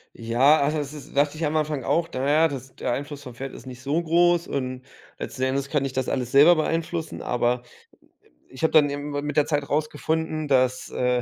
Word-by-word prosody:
Ja, 135 Hz, +6 st, +3 dB
es 150 Hz, -2 st, -3 dB
ist 145 Hz, -3 st, -11 dB
dachte 145 Hz, +2 st, +2 dB
ich 160 Hz, -, -1 dB
am 150 Hz, +1 st, -1 dB
Anfang 150 Hz, -3 st, -1 dB
auch, 165 Hz, 0 st, +1 dB
na 130 Hz, +2 st, -1 dB
ja, 155 Hz, +3 st, +5 dB
das 130 Hz, -2 st, -8 dB
der -, -, -2 dB
Einfluss 145 Hz, +3 st, -4 dB
vom 125 Hz, -3 st, -9 dB
Pferd 135 Hz, +3 st, -7 dB
ist -, -, -11 dB
nicht 130 Hz, -1 st, -9 dB
so 145 Hz, +5 st, 0 dB
groß 175 Hz, +1 st, +3 dB
und 130 Hz, -2 st, -3 dB, 0.4 s
letzten 130 Hz, -, -5 dB
Endes 135 Hz, +1 st, -1 dB
kann 145 Hz, -2 st, 0 dB
ich 135 Hz, -, -4 dB
das 130 Hz, -1 st, -1 dB
alles 125 Hz, -2 st, -2 dB
selber 150 Hz, +6 st, +8 dB
beeinflussen. 165 Hz, +1 st, -2 dB
Aber, 125 Hz, 0 st, 0 dB
ähm, 120 Hz, -, -22 dB, 0.6 s
ich 130 Hz, -, -12 dB
habe 160 Hz, -, +3 dB
dann 150 Hz, -2 st, +5 dB
irgendwann 145 Hz, 0 st, -4 dB
mit 150 Hz, 0 st, -3 dB
der 150 Hz, -, +4 dB
Zeit 145 Hz, -2 st, -1 dB
rausgefunden, 155 Hz, +1 st, -1 dB
dass, 130 Hz, -2 st, +1 dB
äh 125 Hz, 0 st, +1 dB
145 Hz, 215 wpm, -24 LUFS, 130-155 Hz, 0.6 s, selber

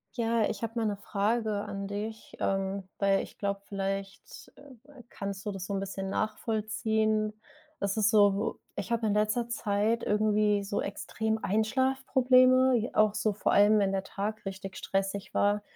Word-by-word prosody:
Ja, 230 Hz, -2 st, +1 dB
ich 210 Hz, -, -5 dB
habe 225 Hz, 0 st, -3 dB
mal 225 Hz, -, +1 dB
'ne 205 Hz, -2 st, -1 dB
Frage 215 Hz, +3 st, 0 dB
an 195 Hz, 0 st, -5 dB
dich. 215 Hz, +2 st, -6 dB
Ähm, 195 Hz, 0 st, -1 dB
weil 195 Hz, -1 st, +3 dB
ich -, -, -12 dB
glaube, 200 Hz, -1 st, -2 dB
vielleicht, 195 Hz, 0 st, -5 dB
äh, 275 Hz, -1 st, -16 dB
kannst 200 Hz, 0 st, -6 dB
du 210 Hz, -, -1 dB
das 195 Hz, -2 st, -6 dB
so 200 Hz, -, -4 dB
'n 195 Hz, -, 0 dB
bisschen 195 Hz, 0 st, -4 dB
nachvollziehen. 215 Hz, 0 st, 0 dB, 0.5 s
Das 200 Hz, +1 st, -1 dB
ist 215 Hz, 0 st, +4 dB
so, 205 Hz, -2 st, +3 dB, 0.2 s
ich 200 Hz, +1 st, -5 dB
habe 230 Hz, -1 st, +1 dB
in 210 Hz, -, +2 dB
letzter 215 Hz, +3 st, +1 dB
Zeit 220 Hz, 0 st, 0 dB
irgendwie 210 Hz, -1 st, +2 dB
so 200 Hz, +1 st, -2 dB
extrem 220 Hz, +2 st, -2 dB
Einschlafprobleme, 255 Hz, +3 st, +3 dB
j 230 Hz, 0 st, -2 dB
auch 215 Hz, -1 st, +4 dB
so 215 Hz, 0 st, 0 dB
vor 205 Hz, -, 0 dB
allem, 210 Hz, +1 st, +6 dB
wenn 195 Hz, -2 st, +2 dB
der 195 Hz, -1 st, -1 dB
Tag 210 Hz, +3 st, -4 dB
richtig 195 Hz, 0 st, -6 dB
stressig 195 Hz, 0 st, -2 dB
war. 205 Hz, +1 st, +2 dB
210 Hz, 170 wpm, -29 LUFS, 200-220 Hz, 0.5 s, allem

